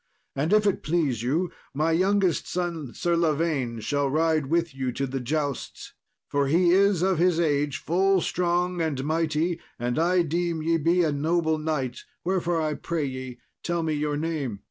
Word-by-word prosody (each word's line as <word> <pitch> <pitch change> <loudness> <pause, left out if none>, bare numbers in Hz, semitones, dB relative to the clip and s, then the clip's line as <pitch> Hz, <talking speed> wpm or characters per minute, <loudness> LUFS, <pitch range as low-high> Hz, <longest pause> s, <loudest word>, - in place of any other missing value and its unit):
And, 145 +6 0
if 210 0 +4
it 200 - +1
please 150 -8 0
you, 160 +9 0 0.2
my 155 +3 +1
youngest 185 0 +2
son, 170 -7 -3
Sir 175 -1 +1
Lavaine, 155 -7 0
shall 140 +5 0
ride 155 0 +1
with 165 0 0
you 130 -1 -2
to 135 - -1
the 135 0 -3
jousts, 145 +1 -3 0.3
for 140 -1 0
he 170 +4 +4
is 195 -1 +4
of 190 -3 +2
his 175 -1 +3
age 145 -3 +1
full 190 +3 +2
strong 175 +1 0
and 145 -5 -1
mighty; 160 +2 0 0.2
and 120 +3 -1
I 175 +2 +3
deem 170 0 -1
ye 165 +1 +2
be 170 +3 +2
a 155 - +1
noble 160 +2 +1
knight, 150 -6 -2 0.2
wherefore 175 -2 0
I 155 -1 0
pray 160 0 -2
ye 130 -2 -6 0.2
tell 170 -1 -1
me 160 -1 0
your 150 0 -1
name." 150 -9 -3
160 Hz, 175 wpm, -26 LUFS, 145-175 Hz, 0.3 s, if